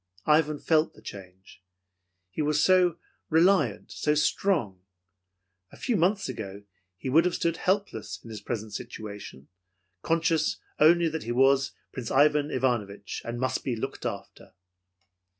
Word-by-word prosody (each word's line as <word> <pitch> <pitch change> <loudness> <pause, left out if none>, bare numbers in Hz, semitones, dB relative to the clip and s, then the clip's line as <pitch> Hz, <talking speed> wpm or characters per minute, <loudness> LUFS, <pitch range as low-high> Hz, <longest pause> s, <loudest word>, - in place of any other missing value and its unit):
Ivan 150 0 +3
felt 155 +1 +1
the - - -16
change; 95 -1 -11 0.7
he - - -3
was 150 0 +2
so 180 -3 +4 0.3
reliant, 160 - +3
so 150 0 0
strong. 150 - 0 0.9
A - - -14
few 245 - -1
months 195 +3 +1
ago, 100 -5 -7 0.3
he 115 - -7
would 155 +6 +5
have 180 -1 0
stood 170 -1 0
helpless 190 - -1
in 115 - -10
his 105 -2 -7
present 110 -1 -5
situation, 105 - -8 0.5
conscious 165 +1 +1 0.2
only 170 +2 +5
that 160 0 -4
he 120 - -3
was 135 +2 +3 0.2
Prince 125 -3 -6
Ivan 145 +1 +3
Ivanovich 110 -7 -2
and 120 +1 -5
must 130 0 -1
be 125 - -1
looked 110 - -5
after. - - -7
145 Hz, 140 wpm, -27 LUFS, 110-165 Hz, 0.9 s, would